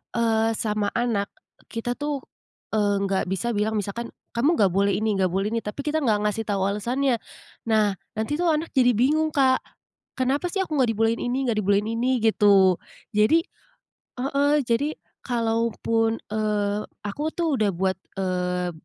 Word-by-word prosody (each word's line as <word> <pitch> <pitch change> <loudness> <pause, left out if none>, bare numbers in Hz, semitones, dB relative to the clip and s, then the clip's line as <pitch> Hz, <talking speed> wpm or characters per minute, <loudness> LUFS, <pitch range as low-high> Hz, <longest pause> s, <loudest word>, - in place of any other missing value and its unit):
eee, 225 -1 +2
sama 210 -2 -1
anak, 225 -4 -1 0.4
kita 240 +1 -3
tuh, 290 -2 -2 0.5
eee, 205 -1 +2
enggak 195 -1 0
bisa 190 +6 -2
bilang 215 +2 0
misalkan, 205 +4 -5 0.2
"Kamu 290 +8 +3
enggak 195 -4 +4
boleh 200 0 +3
ini, 215 +1 0
enggak 185 -2 +1
boleh 195 +2 0
ini," 230 0 -2
tapi 210 +7 -4
kita 300 +2 -1
enggak 210 -4 +2
ngasih 225 +2 -3
tau 200 -2 -1
alasannya. 240 +6 0 0.5
Nah, 215 -3 +2 0.2
nanti 220 +7 -1
tuh 335 -1 +2
anak 315 +2 -2
jadi 250 -2 +5
bingung, 305 +7 +2
Kak. 260 -2 +4 0.6
"Kenapa 265 +5 0
sih 390 - 0
aku 320 -5 -2
enggak 250 -4 +3
dibolehin 225 +1 +1
ini, 245 +1 -1
enggak 230 -3 0
dibolehin 205 +1 +1
ini," 245 +2 0
gitu. 200 -4 +5 0.4
Jadi 215 +11 +5 0.7
heeh, 280 +3 +1
jadi, 260 +6 0 0.3
kalaupun, 230 -1 0 0.2
eee, 210 -1 0 0.2
aku 295 +10 -3
tuh 325 -7 0
udah 215 - +3
buat, 190 +1 0 0.2
eee, 180 -1 -1
225 Hz, 160 wpm, -24 LUFS, 205-260 Hz, 0.7 s, jadi